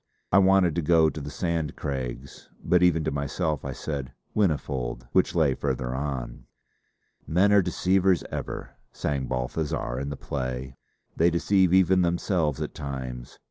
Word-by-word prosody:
I 95 - +6
wanted 95 -3 +4
to 85 - 0
go 80 0 +4
to 75 - -7
the 70 - -6
Sand 80 0 -2
Craigs; 65 -1 -5
but 90 0 +3
even 85 -3 +4
to - - -1
myself 70 +2 -2
I - - -4
said 70 -5 -5 0.2
'Whinnyfold' 65 - -1
which 95 - +2
lay 80 -5 +3
farther 65 -2 -2
on. 65 -3 -4 0.8
"Men 95 +5 +3
are 100 - +7
deceivers 90 0 +2
ever," - - -5 0.2
sang 70 -3 -2
Balthazar 65 0 -2
in 70 +1 -3
the 70 - -5
play: 65 -1 -4 0.4
they 85 +2 +4
deceive 95 +2 +2
even 95 0 +5
themselves 85 -4 0
at - - -4
times. 65 -4 -6
75 Hz, 150 wpm, -26 LUFS, 65-90 Hz, 0.8 s, are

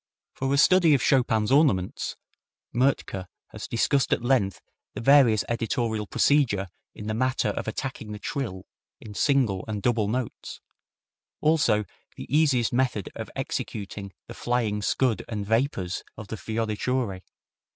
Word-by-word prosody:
For 135 0 -2
a 140 - +3
study 165 0 +6
of 130 - 0
Chopin's 115 -5 +2
ornaments, 135 - +2 0.6
Mertke 120 -7 0 0.2
has - - -8
discussed 135 +4 +1
at - - +1
length 120 -7 +1 0.4
the - - -4
various 120 -4 +5
editorial 115 -2 -1
procedure 110 -11 +2 0.3
in 105 - -8
the 110 - -2
matter 130 -1 +1
of 105 - -4
attacking 110 -1 -4
the 105 - -5
trill 105 -6 -4 0.3
in 105 - -10
single 120 -7 +2
and 105 -1 -3
double 110 -1 +1
notes, 125 +2 -4 0.8
also 130 -10 +3 0.3
the - - -7
easiest 135 -7 +3
method 125 -5 0
of - - -7
executing 100 -1 -4
the - - -9
flying 115 -4 -1
scud 120 +2 +1
and 105 -3 -3
vapors 110 -5 0
of 105 -2 -9
the - - -3
fioriture. 110 -1 -2
115 Hz, 140 wpm, -26 LUFS, 105-130 Hz, 0.8 s, study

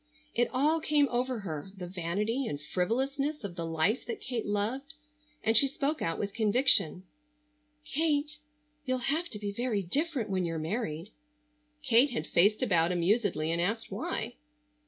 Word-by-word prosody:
It 240 +1 +2
all 300 +5 +2
came 300 -2 +3
over 250 -1 -1
her, 165 -1 -5
the 180 - -5
vanity 195 +8 -2
and 145 - -3
frivolousness 265 - -1
of 190 -4 -5
the 170 -1 -4
life 165 +9 +1
that 235 - -4
Kate 245 -5 -3
loved, 240 +9 -2 0.5
and 225 - +2
she 275 +5 +7
spoke 290 +2 -1
out 165 0 -1
with 200 -1 -3
conviction: 220 - +3 0.8
"Kate, 300 -1 0 0.4
you'll 255 0 0
have 340 +3 -2
to 210 - -5
be 205 -1 -3
very 220 -2 -1
different 275 - -1
when 185 -1 +1
you're 165 -1 -2
married." 160 -1 -3 0.7
Kate 245 +5 +5
had 160 - -3
faced 205 +9 +3
about 175 -7 +3
amusedly 175 -3 +1
and 170 +1 +1
asked 225 +6 -1
why. - - -3
220 Hz, 155 wpm, -30 LUFS, 180-270 Hz, 0.8 s, she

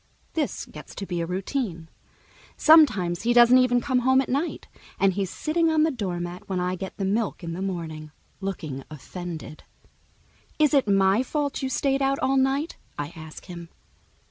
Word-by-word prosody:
This 310 -3 -2
gets - - -12
to 200 - -5
be 175 -2 -3
a 165 - -2
routine. 185 - -3 0.7
Sometimes 220 - +5
he 240 +1 +2
doesn't 240 +1 +7
even 250 -1 +3
come 260 -2 +1
home 260 +1 +4
at 265 - -1
night, 285 +7 -2 0.3
and 195 -1 +3
he's 195 -1 -2
sitting 330 - 0
on 315 -1 +3
the 320 - +2
doormat 180 -7 -5
when 185 -2 -1
I 180 0 -1
get 190 +1 -6
the 195 - -2
milk 210 -1 -1
in 165 0 -4
the 180 - -5
morning, 165 -5 -4 0.3
looking 160 -9 -5
offended. 160 +1 -8 0.9
"Is 305 -1 +3
it 275 -6 +3
my 195 +2 +4
fault 285 +2 -2
you 265 - -1
stayed 275 +1 0
out 270 0 +2
all 270 0 +1
night?" 270 +4 +1 0.2
I 145 0 -3
ask 160 -1 -10
him. 170 -2 -9
200 Hz, 175 wpm, -25 LUFS, 175-270 Hz, 0.9 s, doesn't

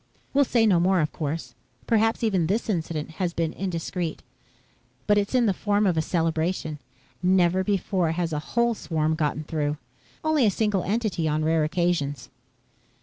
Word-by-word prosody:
"We'll 280 0 +4
say 235 -3 +3
no 190 -5 +4
more, 185 +2 +3
of 150 -2 0
course. 155 +1 -4 0.3
Perhaps 225 0 +2
even 190 -7 +2
this 215 +4 0
incident 160 -4 -3
has 175 -2 -1
been 165 -1 -1
indiscreet. 175 -2 -3 0.8
But 205 0 +4
it's 205 +5 -2
in 245 -2 +4
the 200 - +3
form 205 +2 +1
of 180 -3 +2
a 160 - +2
celebration. 160 -1 -1 0.4
Never 185 0 +3
before 190 -4 0
has 170 -1 -2
a 150 - 0 0.2
whole 235 0 +4
swarm 160 -6 -1
gotten 155 -1 -1
through. 150 -1 -2 0.5
Only 315 -3 +2
a - - +5
single 210 -1 0
entity 205 -5 -1
on 155 0 0
rare 160 0 +2
occasions." 155 -5 -1
175 Hz, 165 wpm, -25 LUFS, 160-205 Hz, 0.8 s, a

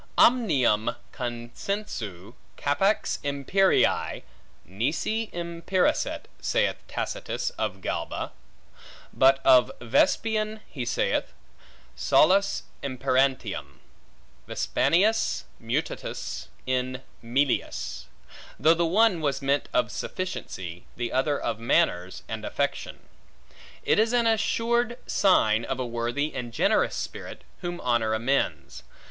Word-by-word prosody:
Omnium 140 - +4 0.2
consensu 120 - -5 0.2
capax 195 +9 +1
imperii, 145 +8 +2 0.4
nisi 150 - -1
imperasset, 170 +2 0 0.2
saith - - +1
Tacitus - - -3
of - - -3
Galba; - - -3 0.8
but 135 +1 +5
of 130 -2 +6
Vespasian 215 - +1
he 125 -5 -5
saith, 120 - 0 0.6
Solus 200 +5 +3 0.2
imperantium, 130 0 0 0.7
Vespasianus 215 +6 +2 0.2
mutatus 120 +7 -3 0.2
in 130 0 -1 0.2
melius; 130 +4 -1 0.5
though 155 +5 +6
the 170 +1 +1
one 195 -1 +3
was 140 -2 -1
meant 140 +1 +1
of 120 -1 +1
sufficiency, 95 - -5
the 120 0 -2
other 140 +2 +1
of 110 - -2
manners, 95 -5 +1
and - - -5
affection. - - -3 0.8
It - - +3
is 225 +2 +3
an 240 -1 +3
assured 230 +2 +1
sign 115 - +3
of 130 +2 -3
a 130 - -1
worthy 120 +5 -2
and 125 -2 -5
generous 115 - +2
spirit, - - -6 0.2
whom 175 0 -4
honor 115 -3 +1
amends. 130 +5 -1
140 Hz, 100 wpm, -26 LUFS, 120-195 Hz, 0.8 s, of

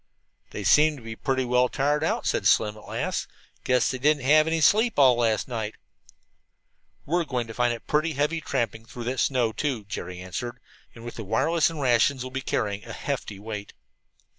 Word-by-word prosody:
"They 105 - -6
seem 150 +10 +5
to 125 - -13
be 110 0 -7
pretty 130 +2 -1
well 125 0 +3
tired 145 +2 0
out," 160 - -1
said - - +1
Slim 105 0 +3
at 105 - -14
last. - - -2 0.4
"Guess 125 -1 +2
they 130 - -4
didn't 145 +1 +2
have 155 +4 +5
any 165 0 +1
sleep 215 - +3
at - - +5
all 130 -2 +7
last 115 -2 +1
night." 110 -4 -4 1.3
"We're 170 +4 +1
going 125 -6 -2
to 115 - -9
find 120 +1 +1
it 115 -1 -6
pretty 155 +2 +1
heavy 150 +4 0
tramping 115 -6 -2
through 120 - -8
that 125 +2 -2
snow, 125 -4 +2
too," 130 -6 -2
Jerry 90 -2 -6
answered. 120 +7 -6 0.4
"And 115 0 -11
with 120 - -8
the 110 - -5
wireless 155 - +2
and 165 -2 -7
rations 130 0 +2
we'll 130 - -7
be 135 +1 -3
carrying 105 -5 -2
a - - -8
hefty 100 - -4
weight." 105 0 -7
125 Hz, 200 wpm, -26 LUFS, 115-145 Hz, 1.3 s, all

